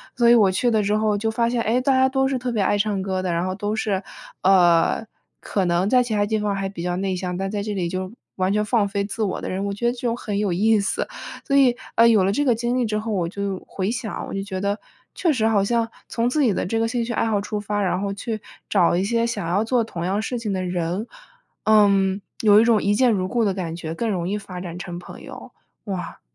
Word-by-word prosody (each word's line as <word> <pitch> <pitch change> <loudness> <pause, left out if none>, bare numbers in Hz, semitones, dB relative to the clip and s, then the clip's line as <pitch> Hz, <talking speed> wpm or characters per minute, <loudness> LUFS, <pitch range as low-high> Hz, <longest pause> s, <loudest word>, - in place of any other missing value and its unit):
所 235 -1 +4
以 240 - +8
我 205 -5 +5
去 210 +6 +1
了 220 -2 +3
之 205 +1 +1
后 215 -1 +1
就 225 +2 -1
发 230 +1 +1
现， 240 -1 0
诶， 240 +4 +1
大 275 - +2
家 260 0 +4
都 265 0 +1
是 270 - 0
特 250 0 -3
别 210 -3 +1
爱 205 - +2
唱 205 -1 0
歌 190 -1 -2
的。 180 -2 -1
然 170 +1 0
后 185 - -2
都 205 +2 -2
是， 205 -3 -1 0.4
呃， 180 +2 +4 0.4
可 195 -2 -1
能 175 +3 +1
在 255 +1 +5
其 240 -3 -2
他 205 -1 +2
地 215 +1 0
方 205 -1 -1
还 195 0 -2
比 190 -3 -7
较 175 0 -1
内 190 +1 -1
向， 180 -1 -3
但 195 0 -3
在 205 -1 -2
这 210 0 -3
里 180 -3 -1
就 185 +2 -4 0.2
完 185 +1 +1
全 210 0 +2
放 210 -2 +1
飞 200 0 -2
自 205 +3 -5
我 195 - -2
的 - - -4
人， 190 +2 -2
我 200 - -2
觉 220 +4 -4
得 240 - +4
就 240 -1 -2
很 210 -4 -3
有 205 -4 0
意 215 +4 +3
思。 200 - -1 0.4
所 275 - +2
以， 255 -3 +5 0.2
啊， 230 +1 +6
有 215 -5 +5
了 195 - +2
这 290 +7 0
个 245 -4 +3
经 240 +2 -1
历 250 - +1
之 215 -1 -1
后， 220 0 -4
我 180 -4 0
就 200 0 -4
回 195 +2 -2
想， 235 -3 -4
我 - - -7
就 195 - -2
觉 190 -2 -5
得， 200 +1 -1 0.4
确 340 -4 +2
实 220 -4 +1
好 210 -3 +3
像 230 +2 +1 0.2
从 235 +1 0
自 300 +4 +1
己 235 - +4
的 - - -1
这 225 +5 -1
个 225 - +1
兴 240 0 -1
趣 235 - -3
爱 - - +1
好 215 -2 +1
出 210 +1 -3
发， 205 0 -2
然 185 -1 0
后 200 -1 -2
去 215 +1 -4 0.3
找 180 -4 +3
一 180 - +1
些 230 +3 +1
想 205 -7 -3
要 190 +5 +1
做 235 +1 +1
同 175 -6 -6
样 195 +3 0
事 240 +2 -3
情 220 -3 -3
的 185 -1 -2
人， 180 +3 -2 0.6
嗯， 200 -2 +4 0.2
有 210 -1 +6
一 - - +5
种 225 -3 +4
一 205 +1 +2
见 250 +1 +4
如 185 -3 0
故 235 +1 +1
的 200 - +1
感 175 -4 -4
觉， 165 -2 -5
更 230 +6 -2
容 180 -4 -1
易 205 - -1
发 185 -3 -8
展 175 -2 -6
成 175 -1 -6
朋 175 - -11
友。 - - -10 0.3
哇。 190 -4 -5
205 Hz, 295 characters per minute, -23 LUFS, 190-230 Hz, 0.6 s, 以